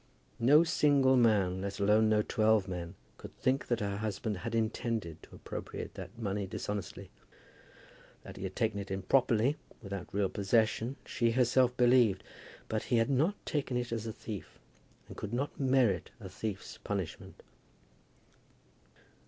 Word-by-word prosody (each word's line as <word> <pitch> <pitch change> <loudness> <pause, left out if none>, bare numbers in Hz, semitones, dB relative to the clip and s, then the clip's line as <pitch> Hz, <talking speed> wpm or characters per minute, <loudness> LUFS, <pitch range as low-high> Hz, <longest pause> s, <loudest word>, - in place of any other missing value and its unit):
No 145 +7 +6
single 145 -5 +4
man, 100 -6 +3
let 100 0 -4
alone 105 +2 +4
no 105 -1 +3
twelve 110 -3 +2
men, 85 -2 -5 0.2
could - - -11
think 130 +2 0
that 120 -2 0
her 100 -1 -2
husband 110 0 -3
had 115 +5 -4
intended 110 -6 -2
to - - -14
appropriate - - -7
that - - -9
money 100 -3 -2
dishonestly. 100 +1 -5 1.1
That - - -10
he - - -9
had 95 -1 -5
taken 110 -4 0
it 100 - -6
improperly, 120 +6 +2 0.2
without 100 -4 -7
real 100 0 +1
possession, 110 +5 +1
she 115 - +1
herself 125 0 +3
believed; 120 -5 +4 0.4
but 110 -1 -2
he 120 - +2
had 115 +4 +2
not 155 +10 +2
taken 135 -4 -1
it 125 -1 -3
as 115 -1 -3
a - - -2
thief, 105 -2 -8 0.5
and - - -10
could 105 +1 -6
not 140 +4 -2
merit 130 -8 +2
a 95 -4 -8
thief's 100 +1 -6
punishment. 95 -5 -5
110 Hz, 150 wpm, -32 LUFS, 100-125 Hz, 1.1 s, No